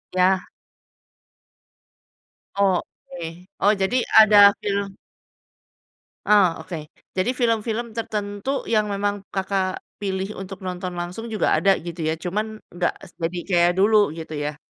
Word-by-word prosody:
Ya. 185 0 +3 2.1
Oke, 180 -2 -2
oh 205 - +5
jadi 195 +5 0 0.2
ada 215 -1 +6 0.3
film 200 -1 -2 1.3
Ah 200 -5 +4
oke. 180 -3 -6 0.4
Jadi 185 +6 +1
film-film 230 -1 0
tertentu 210 +4 -3
yang 215 -2 +2
memang 205 0 -1
Kakak, 190 -1 -1
pilih 195 -1 -3
untuk 195 0 -8
nonton 180 0 -4
langsung 175 +5 -5
juga 215 - +2
ada 195 -1 +4
gitu 170 -1 -4
ya, 160 - +1
cuman 215 +5 -3
enggak 175 0 -1 0.2
se - - -25
jadi 170 +1 -3
kayak 175 -1 +4
dulu 210 -5 +4
gitu 160 -1 -8
ya. 145 0 -3
195 Hz, 120 wpm, -23 LUFS, 180-210 Hz, 2.1 s, ada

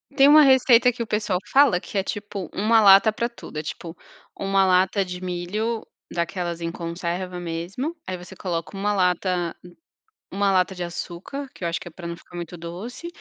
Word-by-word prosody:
Tem 275 - +7
uma 300 +1 +8
receita 255 -2 +6
que 235 - -7
o 230 - -2
pessoal 210 -4 0
fala 265 -10 +5
que 200 - -6
é 195 - +2
tipo 205 -3 -5
1 220 +2 +3
lata 200 +2 +7
pra 235 +2 -1
tudo, 235 -9 -11
é 155 - -2
tipo 165 +2 -7 0.4
1 195 0 +2
lata 190 +2 +3
de 180 -1 -7
milho 190 +6 -3 0.3
daquelas 175 -1 -2
em 165 0 -2
conserva 175 +2 -4
mesmo, 175 - -4
aí 185 - -3
você 180 +2 -11
coloca 175 +1 -4
1 205 +1 0
lata 180 -2 0 0.8
1 200 +1 +1
lata 190 0 +2
de 180 - -5
açúcar, 175 +10 -6
que - - -15
eu 170 - 0
acho 165 - -1
que - - -11
é - - -15
pra 170 +2 -9
não 170 - -5
ficar 175 - -19
muito 175 0 -6
doce, 180 - -7
185 Hz, 195 wpm, -24 LUFS, 175-210 Hz, 0.8 s, uma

